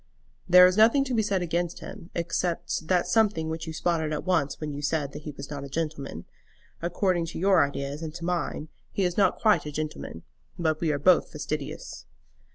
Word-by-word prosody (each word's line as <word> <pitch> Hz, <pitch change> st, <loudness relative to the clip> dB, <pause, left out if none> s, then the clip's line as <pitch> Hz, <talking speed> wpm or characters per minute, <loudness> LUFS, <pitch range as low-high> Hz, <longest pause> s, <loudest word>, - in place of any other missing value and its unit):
"There 180 Hz, +1 st, +9 dB
is 185 Hz, +2 st, +3 dB
nothing 230 Hz, +6 st, +6 dB
to 260 Hz, -2 st, -3 dB
be 225 Hz, -, +3 dB
said 200 Hz, -3 st, 0 dB
against 175 Hz, 0 st, -1 dB
him, 170 Hz, -, -10 dB
except 170 Hz, -1 st, -2 dB
that 180 Hz, -1 st, +2 dB
something 205 Hz, -8 st, +2 dB
which 160 Hz, +1 st, -4 dB
you -, -, -3 dB
spotted 160 Hz, -1 st, 0 dB
at 150 Hz, -, -2 dB
once 165 Hz, -7 st, 0 dB
when 150 Hz, -2 st, -4 dB
you 145 Hz, -, -5 dB
said 145 Hz, -1 st, -1 dB
that 150 Hz, -, -8 dB
he 150 Hz, -, -6 dB
was 140 Hz, 0 st, -9 dB
not 140 Hz, -1 st, -5 dB
a 140 Hz, -, -8 dB
gentleman. 140 Hz, -, -4 dB, 0.6 s
According 175 Hz, 0 st, 0 dB
to -, -, -6 dB
your 190 Hz, -3 st, +5 dB
ideas, 140 Hz, +1 st, -4 dB
and 160 Hz, -1 st, -4 dB
to 170 Hz, -1 st, -6 dB
mine, 170 Hz, -3 st, -2 dB, 0.2 s
he 195 Hz, -, -1 dB
is 180 Hz, -1 st, 0 dB
not 195 Hz, -3 st, +3 dB
quite 215 Hz, -8 st, +3 dB
a -, -, -4 dB
gentleman; 150 Hz, -, -5 dB, 0.3 s
but 160 Hz, -2 st, 0 dB
we 165 Hz, -3 st, +2 dB
are 145 Hz, -, 0 dB
both 175 Hz, +4 st, +4 dB
fastidious." 60 Hz, -1 st, -5 dB
165 Hz, 205 wpm, -27 LUFS, 150-180 Hz, 0.6 s, There